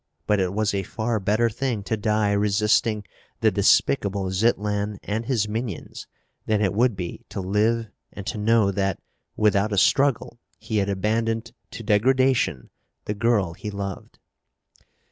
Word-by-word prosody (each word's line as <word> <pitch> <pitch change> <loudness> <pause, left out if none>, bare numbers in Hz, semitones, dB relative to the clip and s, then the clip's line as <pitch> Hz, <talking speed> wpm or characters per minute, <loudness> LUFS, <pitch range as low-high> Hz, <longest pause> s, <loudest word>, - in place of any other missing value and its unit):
But 105 -1 +2
it 95 -1 0
was 105 +1 0
a 100 - 0
far 110 +4 -2
better 105 +4 +2
thing 115 -2 -2
to 110 - -1
die 105 -1 +1
resisting 105 +1 +2 0.4
the - - +4
despicable 95 +6 +2
Zitlan 105 0 0
and 110 +3 -3
his 115 -6 +1
minions 110 -3 -5 0.4
than 110 -1 +2
it 100 -3 +1
would 120 +1 +2
be 90 -2 -6
to - - -5
live 110 +4 +1 0.2
and 100 - -8
to 110 +1 -4
know 110 -1 +3
that, 95 -1 -1 0.4
without 105 0 +2
a 100 - -1
struggle, 135 +2 +2 0.2
he 110 - -3
had 100 -1 +1
abandoned 115 +3 -1 0.2
to 115 - -8
degradation 120 - +2 0.3
the 105 - -2
girl 105 -5 +1
he 105 - -7
loved. 100 -2 -6
105 Hz, 150 wpm, -24 LUFS, 100-115 Hz, 0.4 s, the